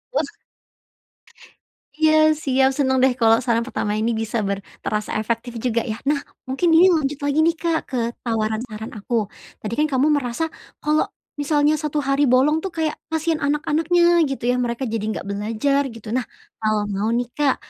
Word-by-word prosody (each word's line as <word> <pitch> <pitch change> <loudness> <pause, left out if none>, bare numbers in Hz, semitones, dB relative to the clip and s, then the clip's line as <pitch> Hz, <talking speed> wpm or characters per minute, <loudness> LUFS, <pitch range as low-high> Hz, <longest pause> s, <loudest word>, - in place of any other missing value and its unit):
Wah! - - 0 1.7
Iya 315 0 +4 0.3
siap 265 -1 +3
senang, 265 -2 +2
deh, 265 -1 +5
kalau 225 -2 +5
saran 235 -2 +1
pertama 210 -4 -2
ini 225 +2 +1
bisa 225 +1 -2
ber 200 0 -2 0.2
terasa 210 0 -2
efektif 230 +2 -3
juga 235 -1 +1
ya. 220 -1 -4
Nah 290 -1 +1 0.2
mungkin 270 +7 0
ini 345 +3 +7
lanjut 295 -3 0
lagi, 285 +1 +1
nih, 335 - +2
Kak 330 -1 0
ke 260 - -2 0.2
tawaran 220 -1 -1
saran 220 -1 -7
aku. 220 +1 -1 0.4
Tadi, 215 +1 -4
kan, 305 - +3
kamu 280 +4 +3
merasa 245 +2 -2 0.4
kalau 305 +1 +2 0.3
misalnya 295 +1 +2
1 300 -1 -2
hari 275 +1 +2
bolong, 290 +5 +3
tuh, 385 - -3
kayak 315 -1 0
kasihan 320 0 0
anak-anaknya 330 +4 +3
gitu, 270 - -5
ya, - - +1
mereka 235 +2 -2
jadi 225 -2 -2
enggak 215 - -4
belajar 220 +7 0
gitu. 230 -2 -12
Nah 255 -1 0 0.4
kalau 215 -1 +1
mau, 205 +3 0
nih, 245 0 -1
Kak 290 -3 +2
260 Hz, 175 wpm, -22 LUFS, 225-300 Hz, 1.7 s, ini